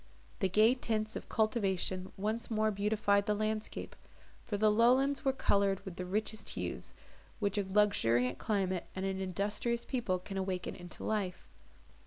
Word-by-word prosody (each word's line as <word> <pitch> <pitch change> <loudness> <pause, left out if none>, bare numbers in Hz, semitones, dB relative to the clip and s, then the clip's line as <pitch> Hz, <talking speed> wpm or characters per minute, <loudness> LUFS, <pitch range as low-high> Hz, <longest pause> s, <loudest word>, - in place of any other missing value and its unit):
The 190 - +2
gay 215 +5 +5
tints 220 -3 -2
of - - -6
cultivation 190 -4 0
once 215 +4 -2
more 215 -1 +2
beautified 200 0 +2
the 210 - +2
landscape; 215 +1 -2 0.5
for 205 - -1
the 215 +1 +4
lowlands 255 +5 +4
were 270 - +3
coloured 200 -6 +2
with 190 -2 -7
the 180 - -4
richest 215 +3 -1
hues, - - -4 0.4
which 205 -2 0
a 200 - -2
luxuriant 125 - +3
climate, 190 -4 -1
and 190 +1 -2
an 190 0 -2
industrious 205 +5 -1
people 235 -8 0
can 195 +2 -7
awaken 190 -1 -2
into 175 -1 -8
life. 200 -5 -2
205 Hz, 155 wpm, -33 LUFS, 190-220 Hz, 0.5 s, gay